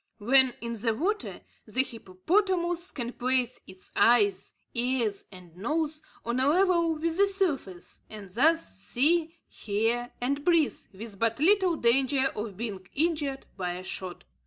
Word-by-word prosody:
When 255 +3 +4
in 235 -2 -5
the 225 -1 +1
water, 410 - -2 0.3
the 260 - +1
hippopotamus 345 - 0
can 240 -2 -5
place 255 -1 0
its 185 0 -8
eyes, 205 -5 +3 0.2
ears, 235 -4 -1
and 180 -3 -14
nose 305 - -2 0.2
on 235 +2 -1
a 260 - +3
level 340 0 +3
with 325 +2 -2
the 400 +1 +5
surface, 305 - -2
and 210 -2 -9
thus 320 - +3
see, 320 - +1
hear, 230 +4 -2
and 280 +4 -1
breathe, 335 -3 +3 0.2
with 200 0 -9
but 230 +1 0
little 370 +2 +4
danger 265 +1 +2
of 210 -3 -5
being 200 -5 -5
injured 295 -3 -1
by 180 -2 -3
a 180 +1 -7
shot. 185 -1 -5
255 Hz, 145 wpm, -28 LUFS, 215-325 Hz, 0.3 s, the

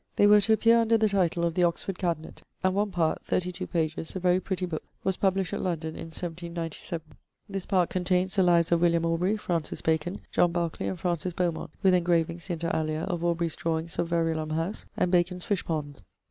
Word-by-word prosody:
They 205 - +5
were 210 0 +7
to 220 +2 +3
appear 230 +1 +5
under 230 0 +3
the 220 0 +3
title 175 -3 +1
of 170 - 0
'The 180 - 0
Oxford 175 +2 -1
Cabinet'; 165 -4 -3 0.2
and 185 0 +3
one 205 +2 +1
part, 170 -4 0
32 180 0 -2
pp., 160 0 -2
a - - -1
very 180 0 +3
pretty 185 -1 -2
book, 160 -3 -4 0.2
was 190 -1 +1
published 190 -2 +1
at - - -2
London 165 -3 -2
in 160 - -7
1797. 170 0 -5 0.4
This 195 -2 -5
part 185 -4 +2
contains 185 +1 +1
the 195 - +4
lives 170 -2 +4
of 170 -1 +3
William 170 -1 +3
Aubrey, 175 +5 +1
Francis 170 -6 -2
Bacon, 160 +4 0
John 175 - +3
Barclay, 170 -2 -2
and 185 - -3
Francis 175 0 -1
Beaumont, 170 -3 -1
with 190 -1 +5
engravings 170 0 +1
(inter 170 -1 -1
alia) 155 0 -1
of 175 -3 -2
Aubrey's 170 -1 0
drawings 165 0 -2
of 170 - +1
Verulam 165 -2 0
House, 165 +6 -3
and 180 - +1
Bacon's 180 0 +1
fishponds. 155 - -2
175 Hz, 200 wpm, -27 LUFS, 165-185 Hz, 0.4 s, were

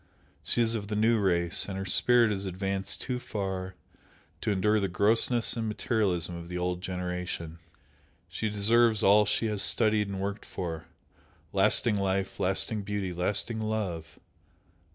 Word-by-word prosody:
She 120 - +2
is 115 0 +1
of 105 -3 -3
the 105 - -3
New 110 +2 +3
Race, 85 -3 +1
and 95 - -4
her 95 - -4
spirit 120 +4 +3
is 100 -1 -3
advanced 95 +1 -3
too 125 -1 -3
far 95 -5 -4 0.7
to - - -2
endure 105 +2 +2
the 100 - 0
grossness 110 +6 +2
and 115 -1 -2
materialism 100 -6 -1
of 85 0 -8
the 90 0 -5
Old 90 0 -2
generation. 90 -3 -5 0.7
She 90 +6 -3
deserves 110 +2 +3
all 105 +1 +5
she 115 - +1
has 105 -2 0
studied 110 -2 +3
and 100 -1 -5
worked 100 +1 -4
for, 80 -4 -6 0.7
lasting 110 -3 +2
life, 95 0 -2
lasting 95 +3 0
beauty, 100 -2 -3
lasting 100 +5 -1
love! 105 -7 -4
100 Hz, 155 wpm, -28 LUFS, 90-110 Hz, 0.7 s, all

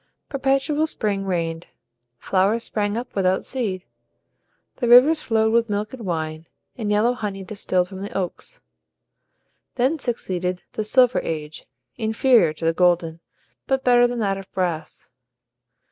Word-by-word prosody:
Perpetual 275 +3 +1
spring 200 -8 -2
reigned, 165 -2 -2 0.5
flowers 200 - +1
sprang 205 0 -2
up 245 +2 -6
without 190 -1 +1
seed, 205 -8 -3 0.9
the 245 - -1
rivers 270 +7 +7
flowed 220 -3 +1
with 230 -1 +2
milk 210 +2 -2
and 235 -6 -7
wine, 160 -1 -3 0.3
and 220 -4 -4
yellow 215 +4 +3
honey 205 -5 -5
distilled 185 -3 -1
from 190 0 -9
the 200 - -5
oaks. 195 - -5 1.1
Then 265 +6 +1
succeeded 185 -7 -3
the 215 - -2
Silver 250 +3 +4
Age, 155 -1 -6 0.3
inferior 220 -4 +3
to 155 +1 -7
the 165 - +3
golden, 170 -2 +1 0.5
but 265 -1 0
better 245 -1 +5
than 245 0 -4
that 195 -3 -1
of 195 - -12
brass. 175 -5 -3
210 Hz, 140 wpm, -22 LUFS, 180-245 Hz, 1.1 s, rivers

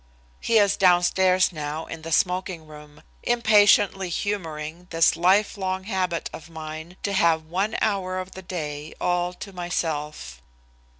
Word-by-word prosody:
He 230 - +2
is 200 -2 +4
downstairs 185 0 +4
now 155 0 -5
in 165 - -8
the 165 +1 -7
smoking 180 -1 0
room, 150 -1 -14 0.2
impatiently 205 -5 +4
humoring 170 -3 -4
this 165 -1 +3
lifelong 190 +1 +1
habit 185 -4 -2
of 165 - -10
mine 160 +2 -8
to 200 - -1
have 165 -4 +3
one 190 +7 -1
hour 190 -3 0
of 185 0 -5
the 190 - -9
day 155 -4 -6
all 175 0 0
to 195 +2 -10
myself. 155 - -4
180 Hz, 135 wpm, -24 LUFS, 160-190 Hz, 0.2 s, is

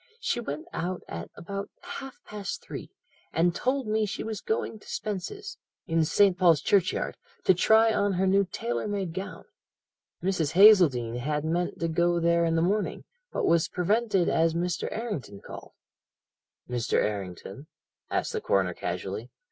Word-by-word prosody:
She 445 - -1
went 155 -10 -5
out 180 +2 -3
at 85 0 -6
about 200 +3 -5
half 280 -7 -8
past 205 -2 -5
three, - - -7 0.4
and 170 +1 +2
told 260 +5 0
me 215 0 +1
she - - -4
was 220 -2 -4
going 220 0 -2
to - - -18
Spence's, 225 - -5 0.3
in 165 -1 +2
St. 195 +3 +4
Paul's 175 -5 +4
Churchyard, 190 -3 +1 0.3
to 190 - +6
try 220 +5 +5
on 205 -1 +1
her 185 +1 +1
new 195 +1 +4
tailor 120 0 -2
made 195 -5 -2
gown. 190 +2 -6 0.8
Mrs. 175 -6 0
Hazeldene 165 - +6
had 150 +4 -1
meant 175 +2 -1
to 165 - 0
go 170 +1 +2
there 170 0 +3
in 165 0 +1
the 165 - +2
morning, 205 +4 0 0.3
but - - -1
was 165 -1 +3
prevented 200 0 +1
as 165 0 +2
Mr. 175 +1 -1
Errington 200 - -4
called.' - - -10 0.9
"'Mr. 120 -2 -2
Errington?' 100 - -2 0.4
asked - - -1
the 445 - -2
coroner - - +1
casually. - - -4
180 Hz, 155 wpm, -28 LUFS, 165-210 Hz, 0.9 s, to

